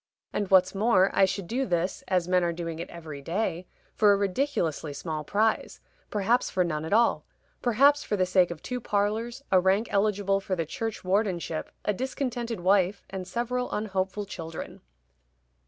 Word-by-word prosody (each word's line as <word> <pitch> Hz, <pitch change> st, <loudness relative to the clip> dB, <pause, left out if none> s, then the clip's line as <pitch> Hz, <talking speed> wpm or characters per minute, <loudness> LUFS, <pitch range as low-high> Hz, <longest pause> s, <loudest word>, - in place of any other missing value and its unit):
And 205 Hz, -2 st, -1 dB
what's 185 Hz, 0 st, +5 dB
more, 200 Hz, -2 st, +3 dB
I 195 Hz, -, +5 dB
should 190 Hz, 0 st, -3 dB
do 255 Hz, +8 st, -1 dB
this, 175 Hz, 0 st, -1 dB
as 180 Hz, -2 st, +1 dB
men 180 Hz, 0 st, +3 dB
are 170 Hz, -, +1 dB
doing 165 Hz, -1 st, -5 dB
it 170 Hz, -, -5 dB
every 155 Hz, -4 st, -8 dB
day, 180 Hz, +2 st, -2 dB, 0.3 s
for 210 Hz, -1 st, +5 dB
a 200 Hz, -, +4 dB
ridiculously 190 Hz, -, -1 dB
small 155 Hz, +1 st, -4 dB
prize 215 Hz, +7 st, 0 dB, 0.3 s
perhaps 215 Hz, +4 st, +1 dB
for 185 Hz, -, +1 dB
none 155 Hz, -3 st, -2 dB
at 160 Hz, -, -6 dB
all 230 Hz, +3 st, +3 dB, 0.4 s
perhaps 280 Hz, +5 st, +4 dB
for 210 Hz, -, -1 dB
the 185 Hz, -, +3 dB
sake 180 Hz, -1 st, +3 dB
of 170 Hz, -2 st, -8 dB
two 250 Hz, 0 st, -4 dB
parlors, 220 Hz, +5 st, -1 dB
a 185 Hz, -, +6 dB
rank 190 Hz, +5 st, +2 dB
eligible 200 Hz, -1 st, +2 dB
for 195 Hz, -1 st, -2 dB
the 165 Hz, -2 st, -2 dB
churchwardenship, 190 Hz, -4 st, -2 dB, 0.2 s
a 210 Hz, -, +2 dB
discontented 240 Hz, -2 st, -3 dB
wife, 190 Hz, +1 st, +2 dB
and 190 Hz, -2 st, -5 dB
several 250 Hz, +1 st, -2 dB
unhopeful 200 Hz, -1 st, -2 dB
children." 165 Hz, -4 st, -7 dB
195 Hz, 170 wpm, -27 LUFS, 175-220 Hz, 0.4 s, a